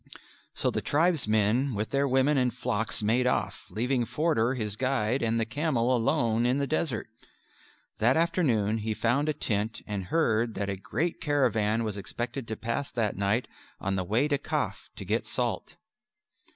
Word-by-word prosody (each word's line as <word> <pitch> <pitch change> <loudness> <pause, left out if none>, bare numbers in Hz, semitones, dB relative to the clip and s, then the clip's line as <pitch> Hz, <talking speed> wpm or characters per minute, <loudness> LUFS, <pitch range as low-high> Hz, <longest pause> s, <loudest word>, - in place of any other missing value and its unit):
So - - 0
the - - -1
tribesmen 130 - +2
with 105 +2 -2
their 140 0 +2
women 135 +3 +3
and 125 -2 +2
flocks 110 -2 -1
made 120 +4 +2
off, - - -1
leaving 120 +5 0
Forder, 135 -4 +1
his 105 -5 -2
guide, 130 0 0
and 115 0 +1
the 115 - +1
camel 130 -1 +1
alone 115 -1 +2
in 125 +2 +2
the 140 - +1
desert. 140 -5 -1 0.9
That 120 +6 +4
afternoon 130 - +2
he 110 0 -2
found 135 +8 +1
a - - +2
tent 110 -4 -2
and 100 -3 -4
heard 115 - +1
that 100 -1 -2
a 100 - -1
great 135 - -2
caravan 115 -6 +2
was 105 -2 -3
expected 120 +5 -5
to 110 - -3
pass 115 +6 -3
that 110 -4 -1
night 100 +5 0 0.3
on 100 0 -1
the 95 - 0
way 110 +10 +1
to 145 -2 +1
Kaf - - -3
to - - -8
get - - -1
salt. - - -2
120 Hz, 170 wpm, -28 LUFS, 110-135 Hz, 0.9 s, That